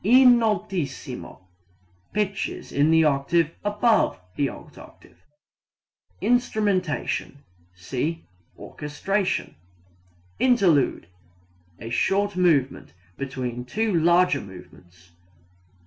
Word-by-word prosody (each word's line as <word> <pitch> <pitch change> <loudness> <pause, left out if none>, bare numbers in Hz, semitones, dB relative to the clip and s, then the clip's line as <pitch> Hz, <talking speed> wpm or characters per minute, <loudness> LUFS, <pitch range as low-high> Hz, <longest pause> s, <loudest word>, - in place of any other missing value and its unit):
In 245 +3 +7
altissimo 190 - -3 0.7
pitches 200 -2 -3
in 145 +2 +2
the 160 0 +5
octave 150 +3 +1
above 210 - +2 0.2
the 140 -2 0
alt - - -12
octave. - - -16 1.0
Instrumentation 205 - -1 0.3
see 135 - -4 0.3
orchestration. 185 +7 -3 0.9
Interlude 185 - +3 0.7
a 115 +2 -8
short 200 +9 +1
movement 150 - +1 0.2
between 130 -3 -5
two 215 - -1
larger 170 -2 +3
movements. 90 -2 -15
165 Hz, 80 wpm, -24 LUFS, 135-205 Hz, 1.0 s, In